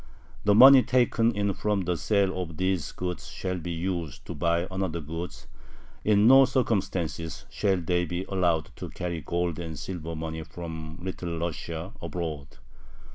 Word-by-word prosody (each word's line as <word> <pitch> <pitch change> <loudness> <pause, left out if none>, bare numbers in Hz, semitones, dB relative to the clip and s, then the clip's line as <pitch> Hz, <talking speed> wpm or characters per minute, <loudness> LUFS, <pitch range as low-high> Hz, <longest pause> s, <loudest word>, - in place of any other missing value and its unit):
The 105 0 +5
money 130 +3 +10
taken 120 -2 +2
in 100 -2 0
from 105 +1 0
the 90 -1 -1
sale 95 0 +1
of 80 -3 -6
these 95 -5 0
goods 90 -1 -5
shall 90 -1 -4
be 85 - -6
used 85 -3 -3
to - - -5
buy 85 +3 +1
other 95 -2 -3
goods. 80 +3 -6 0.6
In 105 0 +4
no 135 +3 +8
circumstances 95 - -1
shall 100 -2 +1
they 90 +1 0
be 90 +2 -3
allowed 85 -5 0
to - - -6
carry 85 -2 -4
gold 85 +1 -2
and 80 -3 -5
silver 85 0 -5
money 80 0 -4
from 80 -1 -7
Little 90 -2 -4
Russia 85 +2 -4
abroad.... 80 -5 -4
90 Hz, 155 wpm, -27 LUFS, 80-95 Hz, 0.6 s, money